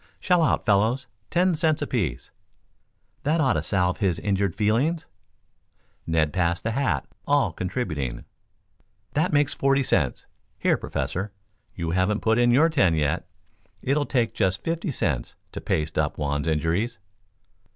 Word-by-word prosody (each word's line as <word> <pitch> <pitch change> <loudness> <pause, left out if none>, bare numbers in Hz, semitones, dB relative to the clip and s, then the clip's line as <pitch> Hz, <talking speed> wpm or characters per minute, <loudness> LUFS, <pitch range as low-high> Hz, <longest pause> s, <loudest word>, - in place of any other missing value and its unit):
"Shell 180 -2 +3
out, 160 - +1
fellows. 110 +5 +2 0.2
Ten 180 +1 +3
cents 155 -1 +1
apiece. 100 - -2 0.9
That 155 +3 +1
ought 135 -4 +3
to - - 0
salve 90 -2 0
his 95 -6 +1
injured 100 -3 0
feelings." 130 +11 +1 1.0
Ned 80 -2 +1
passed 85 0 0
the 115 - -1
hat, 135 +3 0 0.2
all 140 - +2
contributing. 75 - -3 0.9
"That 160 +5 +1
makes 145 -1 +2
forty 135 0 +2
cents. 75 - 0 0.3
Here, - - +2
Professor, 95 +3 -3 0.4
you 85 -2 -3
haven't 95 +4 +1
put 115 +1 +2
in 120 0 +4
your 140 +7 +5
ten 100 - +3
yet. 75 -2 0 0.6
It'll 145 +2 +1
take 120 -4 +1
just 95 -3 0
fifty 165 +1 -2
cents 80 - -1 0.2
to - - -6
paste 80 +1 -1
up 75 -2 0
Juan's 75 0 -2
injuries." 80 +9 0
105 Hz, 140 wpm, -25 LUFS, 85-140 Hz, 1.0 s, your